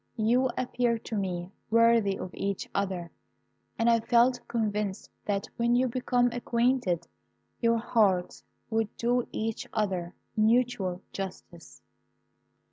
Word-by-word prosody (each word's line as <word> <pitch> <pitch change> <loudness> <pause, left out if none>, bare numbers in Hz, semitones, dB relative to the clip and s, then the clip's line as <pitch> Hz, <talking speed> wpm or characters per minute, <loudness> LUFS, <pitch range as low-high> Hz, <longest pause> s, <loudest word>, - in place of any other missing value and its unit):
You 245 +4 +3
appeared 240 -2 0
to 225 - -4
me 180 -3 -2 0.2
worthy 230 -3 +4
of 185 - -6
each 200 -1 -3
other, 185 -4 -2 0.7
and 230 - +1
I 230 -1 +5
felt 240 +2 +3
convinced 210 -3 -2
that 200 -1 -1
when 235 +1 +2
you 255 +1 +3
became 245 0 +1
acquainted, 240 -6 0 0.5
your 230 -1 +3
hearts 205 -6 +1 0.3
would 225 -1 -1
do 245 +1 +1
each 225 0 -3
other 185 -4 -1 0.2
mutual 215 -5 +2
justice. 180 -3 -8
225 Hz, 120 wpm, -28 LUFS, 195-240 Hz, 0.7 s, I